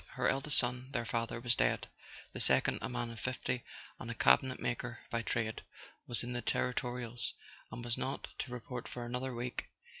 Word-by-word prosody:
Her - - +2
eldest 135 +2 +2
son, 125 +1 +1
their 120 -2 +1
father, 115 0 0
was 120 0 +3
dead; - - +2 0.5
the - - -4
second, - - +5
a - - -1
man 120 -1 -1
of 115 - -7
fifty, 125 -1 -1 0.4
and - - -5
a - - -2
cabinetmaker 120 - +3
by 115 - +1
trade, 110 -1 0 0.5
was 120 - +1
in 125 +1 -3
the 120 - -1
territorials, 120 -2 0 0.4
and 120 - -5
was 120 -1 +1
not 135 +2 -2
to 130 - -2
report 125 0 -4
for 120 -1 -4
another 125 +1 -2
week. 125 +1 -3
120 Hz, 180 wpm, -35 LUFS, 120-125 Hz, 0.5 s, second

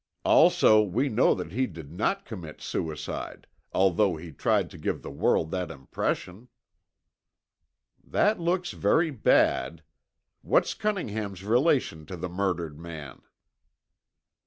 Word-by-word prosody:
"Also 110 0 +6
we 110 +8 0
know 120 +2 +3
that 90 - -6
he 130 +4 0
did 80 -5 -10
not 195 - -1
commit 85 -9 -8
suicide 80 -1 -5 0.3
although 95 0 +2
he 80 +1 -9
tried - - +1
to - - -11
give - - -3
the - - -7
world 80 - +1
that 90 -3 -2
impression." 90 - -4 1.6
"That 210 -1 +1
looks 175 +1 0
very 160 -1 +2
bad. 85 - +2 0.6
What's - - +2
Cunningham's 110 - -3
relation 120 - +1
to 90 - -7
the 90 +2 -4
murdered 85 -5 -2
man?" 80 -5 -9
95 Hz, 120 wpm, -27 LUFS, 80-125 Hz, 1.6 s, Also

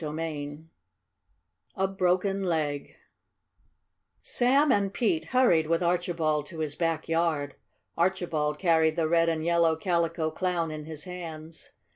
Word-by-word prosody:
CHAPTER 155 +1 -4
II 150 -2 -5 1.1
A 190 - +1
BROKEN 195 +1 0
LEG 150 -5 -2 1.3
Sam 270 +4 +3
and 200 -1 +2
Pete 185 -8 0
hurried 175 -8 +3
with 165 +2 +1
Archibald 170 -4 0
to 170 - -10
his 155 -2 -2
back 165 -1 -1
yard. 165 -4 0 0.4
Archibald 165 -4 0
carried 160 -2 +3
the 165 -2 +1
red 165 0 +3
and 160 -1 -2
yellow 170 -1 +3
Calico 170 -3 0
Clown 170 -1 -1
in 155 -1 -6
his 155 -1 -5
hands. 165 -3 -8
165 Hz, 130 wpm, -27 LUFS, 155-180 Hz, 1.3 s, Sam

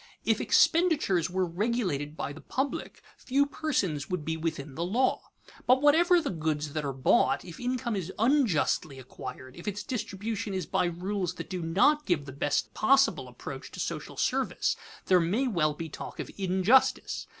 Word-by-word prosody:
If - - +2
expenditures 305 - +3
were 185 +1 0
regulated 175 - -2
by 145 - -3
the 160 - -11
public, 270 +1 -3
few 275 +2 +1
persons 205 - -2
would 180 -5 -3
be 160 - -1
within 155 -3 -4
the 165 - -3
law. 235 +9 +1 0.5
But 255 +1 +6
whatever 345 +4 +5
the 310 - -2
goods 155 -3 -2
that 155 - -2
are 140 - -2
bought, 135 - +2
if 170 -2 -10
income 245 -2 -2
is 190 -2 -3
unjustly 220 - +2
acquired, 130 0 -9
if 175 - -11
its 205 0 -3
distribution 210 -3 -4
is 185 -3 -2
by - - +1
rules 180 +1 -2
that - - -8
do 180 -1 -3
not 200 - +3
give 155 -6 +1
the 140 - -8
best 145 +2 -1
possible 270 +4 +3
approach - - -8
to - - -8
social - - -4
service, - - 0 0.3
there 185 -1 +5
may 200 +11 +1
well 155 -9 +1
be 165 +1 -5
talk 155 - -8
of - - -5
injustice. 190 +7 +2
185 Hz, 170 wpm, -29 LUFS, 160-245 Hz, 0.5 s, But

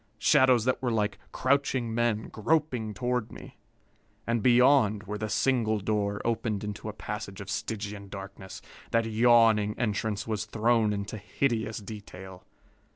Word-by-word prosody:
Shadows 125 -4 +4
that 130 - 0
were 125 - 0
like 105 -2 -1
crouching 130 -3 0
men, 115 -2 0
groping 120 -4 -1
toward 125 -2 -2
me. - - -12 0.7
And 115 -1 0
beyond, 120 -3 +4
where 105 0 -5
the 110 0 -3
single 115 -4 +1
door 100 0 -1
opened 110 -3 -1
into 105 +1 -5
a - - -6
passage 105 -2 -6
of 100 +1 -6
Stygian 105 -3 -4
darkness, 95 -1 -9 0.3
that 115 0 +1
yawning 115 -2 +4
entrance 105 -3 -1
was 110 -2 -2
thrown 110 0 +2
into 100 +1 -4
hideous 110 +2 -1
detail. 95 -3 -10
110 Hz, 140 wpm, -28 LUFS, 105-120 Hz, 0.7 s, Shadows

